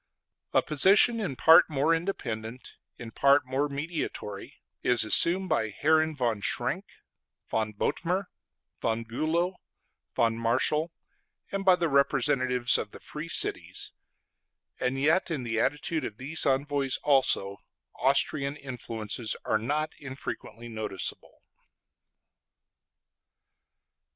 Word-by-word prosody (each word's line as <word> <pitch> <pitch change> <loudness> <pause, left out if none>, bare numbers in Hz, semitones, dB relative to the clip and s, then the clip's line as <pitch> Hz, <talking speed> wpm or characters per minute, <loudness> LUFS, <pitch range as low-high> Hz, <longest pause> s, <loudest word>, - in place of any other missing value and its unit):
A - - +3
position 195 - +4
in 180 -11 -3
part 160 +6 +7
more 150 +2 +2
independent, 125 - -4 0.2
in 115 -2 -9
part 140 +3 +4
more 135 +3 -1
mediatory, 140 - -5 0.3
is 125 -2 +3
assumed 175 - +3
by 110 -1 +1
Herren 155 +7 +2
von 120 -6 -1
Schrenk, - - -1 0.7
von 110 -1 0
Bothmer, 180 - -1 0.6
von 115 0 -1
Bülow, 165 +10 -1 0.6
von 115 -1 +1
Marschall, 130 +8 +1 0.6
and 195 0 -2
by 190 -1 +6
the 175 -1 0
representatives 130 -3 +2
of 105 - -6
the - - -10
Free 150 +2 -8
Cities; - - -1 0.9
and 130 +1 -1
yet 155 +7 +2
in 150 -6 -3
the 115 -2 -2
attitude 160 +5 -1
of 105 - -6
these 150 +5 0
envoys 140 0 +1
also, 130 -8 +2 0.4
Austrian 140 -1 +1
influences 115 -5 -3
are 110 - +1
not 150 +7 -2
infrequently 130 -3 -7
noticeable. 110 -4 -5
140 Hz, 110 wpm, -28 LUFS, 115-160 Hz, 0.9 s, part